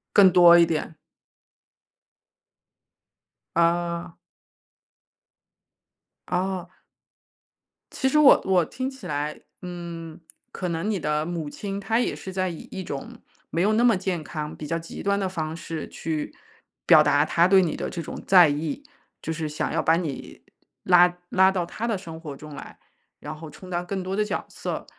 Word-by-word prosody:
更 195 -2 +8
多 175 -1 +8
一 170 - +6
点。 160 -1 -3 2.6
啊。 170 0 0 2.1
哦。 185 0 -2 1.3
其 265 - 0
实 300 - +3
我 285 -3 +7
我 185 -3 +3
听 255 +10 -4
起 265 -1 -10
来， 150 +1 -3 0.2
嗯， 170 -3 -7 0.3
可 180 - -4
能 170 +5 -2
你 205 -3 0
的 150 0 -1
母 165 -3 -4
亲， 195 +5 -5
她 225 +3 0
也 245 - 0
是 190 - -8
在 185 0 0
以 165 - -9
一 190 - -5
种 140 -5 -7 0.3
没 165 - -1
有 210 +4 +3
那 230 +2 +3
么 235 -4 +5
健 185 -3 -2
康、 150 -1 -6
比 150 - -7
较 165 - -1
极 165 0 -8
端 200 0 +1
的 190 -2 -1
方 160 -3 -4
式 165 -2 -6
去 155 -2 -4 0.5
表 155 - +8
达 145 -1 +4
她 170 +2 +3
对 190 0 +6
你 170 -4 -1
的 - - -3
这 170 - -5
种 160 - -7
在 180 -4 +7
意， 150 - -3 0.4
就 160 - -4
是 160 -1 -3
想 150 0 -3
要 - - 0
把 160 - +3
你 160 -6 -5 0.4
拉 180 0 +5
拉 190 0 +5
到 180 -2 -1
她 225 +6 -5
的 225 -4 0
生 165 -4 -9
活 150 -4 -8
中 150 +2 -11
来， - - -10 0.4
然 - - -7
后 155 0 -10
充 185 +4 -13
当 175 0 -2
更 190 +1 -3
多 190 +1 -3
的 210 +1 +1
角 - - -3
色。 - - -5
175 Hz, 180 characters per minute, -25 LUFS, 160-190 Hz, 2.6 s, 更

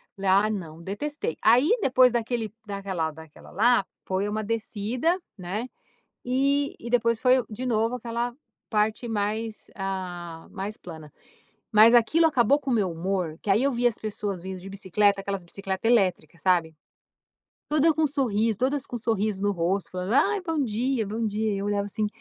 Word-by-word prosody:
Falei: 195 -1 -2
"Ah, 205 +3 +4
não. 170 -6 -5
Detestei." 215 - -4
Aí 255 - +5
depois 255 -3 +5
daquele 230 -2 -2
daquela 195 -5 -3
daquela 160 0 -14
lá, 225 +1 +3 0.2
foi 190 +2 -1
uma 215 +1 -2
descida, 230 - -1 0.2
né, 200 +6 -4 0.6
e 275 +3 +1
e 235 - -8
depois 230 -2 +2
foi 255 0 +5
o 235 - -8
de 245 +4 -5
novo 230 +1 +1
aquela 235 0 -3 0.4
parte 220 +2 0
mais, 215 +1 -2
ah, 180 -4 -5
mais 205 +2 -5
plana. 160 -4 -11 0.6
Mas 220 +3 +8
aquilo 310 +8 +5
acabou 275 -2 +3
com 280 -2 -4
o 245 - +3
meu 200 -5 +1
humor, 175 -2 -2
que - - -9
aí 205 +5 +4
eu 280 0 +2
via 245 0 +3
as 235 - -5
pessoas 205 -4 -4
vindo 190 0 -6
de 190 - -9
bicicleta 200 +1 +1
aquelas 195 -2 -3
bicicleta 190 +4 -3
elétrica, 185 -9 +2
sabe. 165 -2 +1 0.9
Toda 310 +2 +4
com 315 0 +2
sorriso 230 -6 0
todas 270 +2 0
com 240 - -5
sorriso 215 -3 -1
no 205 - +2
rosto, 180 +1 -1
falando: 185 +3 -3
"Ai, 400 +8 +3
bom 325 -5 -1
dia, 235 0 -1
bom 220 +2 -2
dia." 215 0 -1
E - - -2
eu 195 - -3
olhava 205 -1 0
assim. 210 +1 -1
215 Hz, 175 wpm, -26 LUFS, 195-245 Hz, 0.9 s, Mas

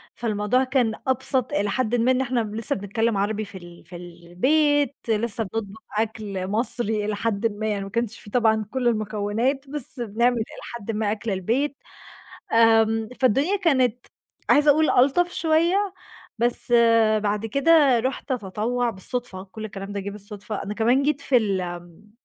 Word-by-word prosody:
فالموضوع 220 +2 0
كان 255 -4 +1
أبسط 260 0 0
إلي 205 -8 0
حدٍ 245 +2 0
ما 240 +2 +3
إن 260 0 +1
إحنا 255 -1 0
لسّه 220 0 -2
بنتكلِّم 210 +2 -1
عربي 210 +2 -1
في 200 -1 -10
ال 175 -1 -13
في 180 - -12
البيت، 245 - 0
لسّه 225 0 0
بنطبخ 215 0 -6 0.2
أكل 210 -4 -2
مصري 220 0 -1
إلي 210 0 -1
حدٍ 225 0 0
ما، 215 - -1
يعني 205 -2 -1
ما 195 - -7
كانش 235 +2 -2
في - - -12
طبعًا 220 -1 +2
كل 255 -2 0
المكونات 220 +5 -1
بس 285 -3 -5
بنعمل 235 +2 +1
إلي 220 - -1 0.3
حدٍ 225 -1 -5
ما 215 -1 -1
أكل 220 +1 -3
البيت، 235 +10 -1 0.8
آمم، 225 -1 +4
فالدنيا 275 - +3
كانت 260 - +1 0.4
عايزة 295 +1 +6
أقول 310 +2 +3
ألطف 285 +8 +3
شوية، 345 +5 +1 0.4
بس 240 +1 -1 0.5
بعد 210 +1 -1
كده 280 +1 +4
رُحت 260 +3 -4
أتطوّع 235 +2 -1
بالصُدفة، 195 -1 -5
كل 215 +3 -9
الكلام 195 -1 -7
ده 200 - -3
جِه 200 +1 -5
بالصُدفة، 210 +1 -7
أنا 205 - -5
كمان 240 +5 +2
جيت 285 0 0
في 280 -2 +2
الم 180 -3 -3
225 Hz, 160 wpm, -24 LUFS, 205-255 Hz, 0.8 s, عايزة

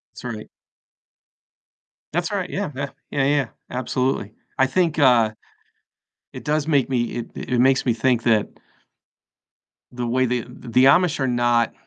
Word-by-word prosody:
That's - - -11
right. 110 -3 -6 1.6
That's 175 +4 -1
right, 195 -3 -2
yeah, 195 -5 -3
yeah, 140 +1 -3 0.2
yeah, 140 -2 0
yeah, 140 -2 +2 0.2
absolutely. 125 -3 -2 0.2
I 130 - +4
think, 165 +1 0
uh, 120 -6 +5 1.0
it - - -9
does 150 0 0
make 145 -5 +2
me 120 -2 +1
it 120 - -6
it 125 -1 -1
makes 130 +1 +3
me 120 - +3
think 120 0 +1
that 110 -3 +3 1.4
the 125 -1 -4
way 130 +2 +2
they 125 0 0
the 125 +1 0
Amish 155 +2 +4
are 135 - +1
not 120 -1 +1
130 Hz, 145 wpm, -22 LUFS, 120-145 Hz, 1.6 s, uh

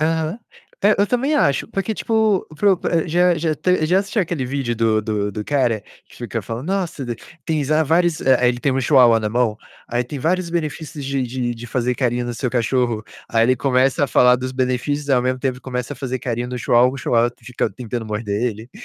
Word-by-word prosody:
Aham. 160 +5 0 0.4
É, 210 +1 +5
eu 200 - +3
também 265 +6 0
acho. 140 - +2
Porque, 195 +3 -2
tipo, 220 -3 +1
para 200 +2 +4
o 185 - 0 0.3
já 175 +2 +3
já 160 -1 0
te 180 0 +1
já 180 +4 +3
assistiu 200 +2 0
aquele 160 -7 -3
vídeo 130 -3 -2
do 110 -1 +1
do 105 -1 -1
do 105 +1 -5
cara 125 -6 +1 0.3
que - - -17
fica 120 -1 -4
falando: 115 - -6
"Nossa, 180 -7 -2
de 120 -2 -4 0.3
tem 155 -3 0
já 155 +3 +2
vários" 165 +2 +2
Eh, 125 -2 +4
ele 120 - 0
tem 140 - +1
um 135 - 0
chihuahua 125 -3 +5
alemão, 110 0 0 0.3
aí 120 +1 0
"Tem 130 +4 -7
vários 175 +5 0
benefícios 155 -3 -4
de 135 0 -1
de 125 -1 -2
de 115 +1 -9
fazer 125 +1 -1
carinho 125 -1 0
no 120 - -3
seu 125 +1 -2
cachorro", 120 -2 0 0.2
aí 115 0 +2
ele 130 +2 +3
começa 130 +2 +2
a - - -1
falar 125 -1 +5
dos 130 +1 -4
benefícios, 130 +3 -1
ao 125 -2 +4
mesmo 130 +1 0
tempo 130 -1 -2
começa 125 +1 -4
a - - -8
fazer 130 0 -3
carinho 120 0 -3
no 125 - -4
chihuahua, 120 +2 +4
o - - -6
chihuahua 120 -2 +2
fica 125 0 -2
tentando 120 -2 -5
morder 105 0 -2
ele? 115 0 -3
130 Hz, 215 wpm, -20 LUFS, 120-155 Hz, 0.4 s, É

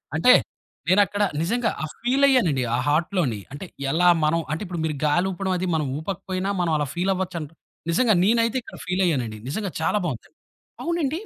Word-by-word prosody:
అంటే 250 +11 +6 0.6
నేనక్కడ 205 +2 +3 0.2
నిజంగా 225 +7 0
ఆ - - 0
ఫీల్ 265 +4 +3
అయ్యానండి, 175 - +3
ఆ - - 0
హార్ట్‌లోని. 155 - +1
అంటే 145 +7 -7 0.3
ఎలా 175 +4 +3 0.2
మనం 155 +2 +2
అంటే 160 - -4
ఇప్పుడు 175 -2 -5
మీరు 155 -2 -2
గాలి 175 +5 +2
ఊపడం 190 0 -2
అది, 185 +1 -2
మనం 155 -2 0
ఊపకపోయినా 190 +2 -3
మనం 170 -2 0
అలా 150 -2 -1
ఫీల్ 180 +3 0
అవ్వచ్చు 185 -2 -3
అంటు 155 0 -8 0.4
నిజంగా 220 +7 +3
నేనైతే 230 +3 +2
ఇక్కడ - - -12
ఫీల్ 180 +1 0
అయ్యానండి. 125 -10 -1
నిజంగా 195 +5 -3
చాలా 210 - +1
బావుందండి. 150 - -6 0.5
అవునండి. 330 -2 -1
180 Hz, 175 wpm, -24 LUFS, 160-210 Hz, 0.6 s, అంటే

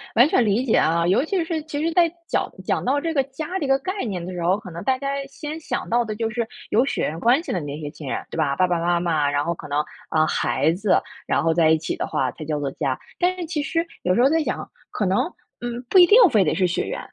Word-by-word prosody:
完 245 +5 +7
全 250 - +3
理 220 +5 +1
解 225 - +2
啊， 170 +1 +3
尤 190 +10 +3
其 355 +1 0
是 320 -2 -2
其 295 -2 -4
实 330 0 0
在 340 -3 +4 0.2
讲 - - -1
讲 - - 0
到 280 +3 +1
这 330 +1 -2
个 275 -2 +2
家 275 +3 -6
的 380 - 0
这 285 - -2
个 270 0 +4
概 375 +6 -4
念 185 -6 -4
的 185 - -6
时 175 - -5
候， 180 +4 +2
可 200 -5 -10
能 170 +3 -7
大 260 +3 +1
家 275 +1 -5 0.2
先 300 +3 -7
想 - - -4
到 240 +1 +2
的 215 -1 -5
就 225 0 -2
是 235 -1 -2 0.2
有 235 +4 +4
血 275 - -2
缘 160 +2 -2
关 245 - +3
系 - - -5
的 180 - 0
那 145 +1 -6
些 145 -1 -6
亲 150 -4 -10
人， - - -3
对 - - -6
吧， 140 -3 +1
爸 185 - +3
爸 175 -1 0
妈 175 0 +1
妈， 155 -4 +1
然 145 +1 0
后 170 - 0
可 160 - -10
能， 145 +1 0 0.3
啊， 155 0 +3
孩 145 +2 +1
子， 200 +2 +2 0.3
然 - - +1
后 165 0 +3
在 160 -1 +4
一 160 - +5
起 155 - -3
的 - - -3
话 130 -2 -1
才 155 - -9
叫 150 -1 -2
做 140 -2 -2
家。 135 -3 -2 0.2
但 365 +1 +1
是 350 - -4
其 310 -2 -2
实 330 +3 -1 0.2
有 180 +1 +1
时 240 - +3
候 - - +6
在 325 +1 +2
想， - - -3 0.2
可 210 - -2
能， 190 +2 +2 0.4
嗯， 240 0 -4
不 375 - +7
一 350 - +8
定 420 - +7
非 210 -5 +4
得 155 - 0
是 185 - +2
血 175 - -1
缘 - - -4
210 Hz, 310 characters per minute, -23 LUFS, -, 0.4 s, 一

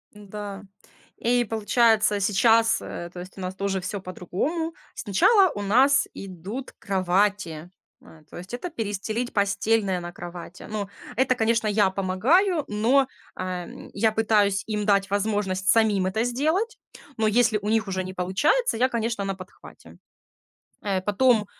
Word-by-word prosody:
Да. 205 -1 -8 0.6
И 245 +1 +1
получается 220 -1 +2
сейчас, 225 +3 +3
э, 170 - -6
то 180 - -8
есть 185 +2 -10
у - - -7
нас 185 0 -4
тоже 195 0 -1
всё 195 +2 -5
по-другому. 235 - -3 0.2
Сначала 375 - +4
у 205 - -5
нас 260 +8 +4
идут 195 +7 -7
кровати, 185 -3 0 0.3
э, 155 -1 -17
то - - -10
есть 180 +5 -10
это 250 +9 -4
перестелить 220 - -3
постельное 200 -1 +1
на 175 0 -6
кровати. 175 0 -9
Ну, 205 -2 -3 0.3
это, 255 +2 +2
конечно, 225 -1 +1
я 205 -2 +3
помогаю, 270 - +2
но, 245 +6 +2 0.3
эм, 180 -1 -6
я 220 +2 +2
пытаюсь 210 -3 +2
им 210 -1 -2
дать 200 -1 +2
возможность 200 -2 -1
самим 210 -4 +3
это 220 +4 0
сделать, 315 - 0 0.4
но 220 -1 +2
если 220 0 +3
у 205 - -3
них 220 -1 +1
уже 190 -1 -2
не 185 0 -7
получается, 225 - +1
я, 255 +3 +3
конечно, 230 -3 -2
на 195 -1 -2
подхвате. 185 +1 -14 0.9
Э, 195 -2 0
потом, 215 +2 +3
210 Hz, 145 wpm, -25 LUFS, 190-230 Hz, 0.9 s, Сначала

